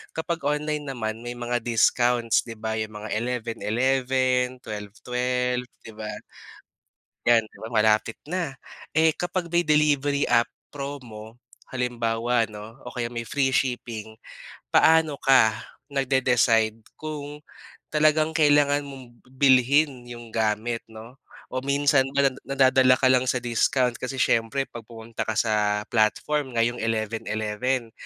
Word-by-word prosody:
kapag 160 0 -3
online 150 0 -2
naman 110 -3 -4
may 120 0 -6
mga 120 0 -2
discounts 120 0 +2
'di 115 -2 -10
ba, 110 0 -3
'yung 110 -1 -4
mga 105 +1 -5
11:11 125 +2 0
12:12 125 +3 -3 0.2
'di 110 - -10
ba. 110 0 -7 1.2
'Yan, 115 -2 +5
'di - - -20
ba 110 - -7
malapit 110 0 +2
na. 165 -4 -3 0.4
Eh, 160 0 +5
kapag 175 -1 -3
may 175 0 +3
delivery 145 -2 +2
app 120 -1 +4 0.2
promo, 125 -6 -8 0.4
halimbawa 120 -2 0
'no, 110 +4 -11
o - - -8
kaya 120 -1 -3
may 115 -2 -5
free 135 0 +1
shipping, 115 -4 -2 0.5
paano 160 -3 +4
ka 120 -6 +4 0.4
nagde-decide 125 -5 +2 0.2
kung, 150 -1 -7 0.5
talagang 155 +1 +3
kailangan 145 -1 +4
mong 135 -3 -10 0.2
bilhin 130 0 +3
'yung 120 -1 -9
gamit 110 +1 -1
'no, 110 +3 -12 0.4
o 130 - -1
minsan 140 -1 +3
nada 140 -1 +3
nadadala 130 -1 +4
ka 130 0 +3
lang 130 0 +3
sa 130 - +1
discount 120 +1 +1
kasi 130 +1 -4
siyempre 115 +4 +1
'pag 115 -2 -10
pumunta 115 0 -6
ka 110 - -1
sa 105 -2 +1
platform 125 +4 0
ngayong 120 +1 +1
11:11 115 +2 -2
125 Hz, 130 wpm, -25 LUFS, 115-140 Hz, 1.2 s, Yan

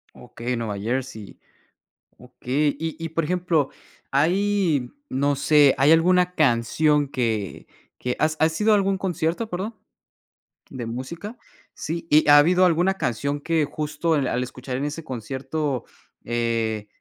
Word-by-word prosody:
Okey, 120 +2 -5
Nueva 110 -3 -3
Jersey. 115 0 -4 0.8
Okey, 130 +4 -2
y 160 -1 -4
y, 165 - -2
por 165 +1 -1
ejemplo, 170 -4 0 0.4
hay, 170 -2 +1 0.2
no 140 +1 0
sé, 145 -1 +5
¿hay 140 +3 +5
alguna 180 +2 +3
canción 145 +2 +2
que 110 -7 -2 0.3
que? 125 0 -3
¿Has 155 0 +1
has 160 +2 +1
ido 215 +1 +4
a - - +7
algún 195 -1 +1
concierto, 175 +3 -2
perdón, 205 +4 -4 0.9
de 120 -4 -6
música? 170 - -6 0.4
Sí, 165 +1 -5
¿y 150 +1 +5
ha 145 0 +9
habido 180 +5 +4
alguna 180 +2 +2
canción 140 -2 -2
que 160 -1 +1
justo 150 +2 -2
al 130 -3 0
escuchar 125 +1 -6
en 140 - -2
ese 150 +3 -5
concierto, 135 +2 -3 0.4
eh, 115 -2 -1
150 Hz, 140 wpm, -23 LUFS, 125-165 Hz, 0.9 s, ha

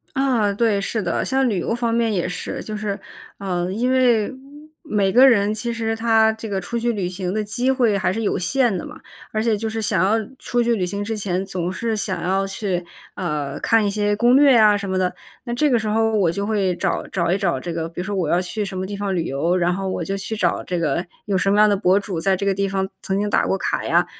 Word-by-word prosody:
啊， 250 -7 +2
对， 210 -1 +1
是 220 +2 -2
的， - - -1
像 265 0 +1
旅 200 -5 0
游 175 - -1
方 235 -1 -1
面 230 -1 +1
也 180 -3 0
是。 180 - -5
就 215 - -5
是， 210 -1 -3 0.4
啊， 180 -3 -2
因 240 +6 0
为 250 -3 +3 0.5
每 205 - +1
个 260 +5 +7
人， 205 -3 +3
其 235 +2 -3
实 225 -1 -2
他 225 -1 +3
这 220 0 -8
个 195 -1 -1
出 235 +6 -4
去 235 +1 0
旅 195 -4 -2
行 180 0 -4
的 215 0 -1
机 240 +5 -1
会 240 -6 +2
还 190 - +1
是 225 +4 -3
有 205 - 0
限 240 +4 +1
的 175 - -4
嘛， - - -10 0.3
而 215 - -1
且 225 -2 +2
就 220 +2 -3
是 225 0 -3
想 200 -4 +1
要 205 +4 +3 0.2
出 240 -1 0
去 235 0 +2
旅 185 -4 -1
行 200 +3 -3
之 225 +2 -3
前 190 -2 -2
总 180 -2 -3
是 225 +4 -2
想 190 -4 -2
要 195 +2 0
去， 195 -2 -2 0.3
啊， 150 -6 -3
看 225 -2 +3
一 - - +1
些 205 0 0
攻 240 +4 +4
略 280 0 +6
呀 215 -3 +6
什 200 -1 -5
么 190 - 0
的。 185 -1 0 0.3
那 240 - -3
这 300 +5 +2
个 245 -3 +3
时 220 - -4
候 225 +1 +1
我 185 -6 +3
就 200 +4 -3
会 200 -4 0
找 - - -1
找 170 -3 -1
一 190 - +2
找 175 -9 0
这 170 +5 -5
个， 165 0 -3
比 170 - -9
如 - - -5
说 205 +1 -3
我 175 -5 -1
要 175 - +3
去 210 +4 -3
什 195 -2 -5
么 185 - -2
地 200 +2 -5
方 200 -1 -2
旅 170 - 0
游， 165 +5 0
然 175 0 +1
后 190 +1 -3
我 - - -2
就 195 - -3
去 200 +3 -4
找 - - 0
这 180 - -3
个 165 +1 0 0.2
有 200 -2 -1
什 195 +1 +1
么 205 - +3
样 215 - +7
的 205 - +3
博 190 0 +3
主， 195 -4 -4
在 195 +2 +2
这 200 - -3
个 200 - +2
地 200 +1 -1
方 190 0 -1
曾 195 - -1
经 205 - 0
打 - - +3
过 195 - +1
卡 - - -2
呀， - - +2
200 Hz, 290 characters per minute, -21 LUFS, 185-225 Hz, 0.5 s, 个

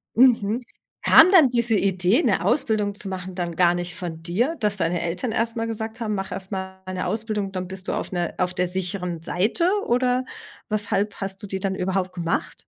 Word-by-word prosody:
Mhm. 235 -2 +4 0.4
Kam 335 +4 +8
dann 320 -9 +7
diese 235 -2 +1
Idee, 190 - +2
'ne - - +2
Ausbildung 210 -7 +1
zu 200 - -7
machen, 185 -1 -5
dann 175 -2 -3
gar 175 0 +4
nicht 175 0 -4
von 170 -4 -6
dir, 235 - 0
dass 210 -2 0
deine 170 0 0
Eltern 180 +8 -2
erst 230 +1 -1
mal 225 -1 -1
gesagt 225 +1 -5
haben: 215 -2 -1
„Mach 195 0 -4
erst 195 +1 -7
mal 190 -1 -5
'ne 185 0 -3
Ausbildung, 215 -2 -2
dann 185 -1 -3
bist 190 0 -6
du - - -1
auf - - -3
'ner 175 -2 -2
auf 180 0 0
der 180 0 0
sicheren 180 -2 -2
Seite“, 215 - +1 0.2
oder 250 +1 +1 0.4
weshalb 210 -1 0
hast 195 0 -2
du 205 - -6
die 190 0 -3
dann 190 0 -1
überhaupt 185 0 -1
gemacht? 170 -2 -2
195 Hz, 205 wpm, -24 LUFS, 180-225 Hz, 0.4 s, Kam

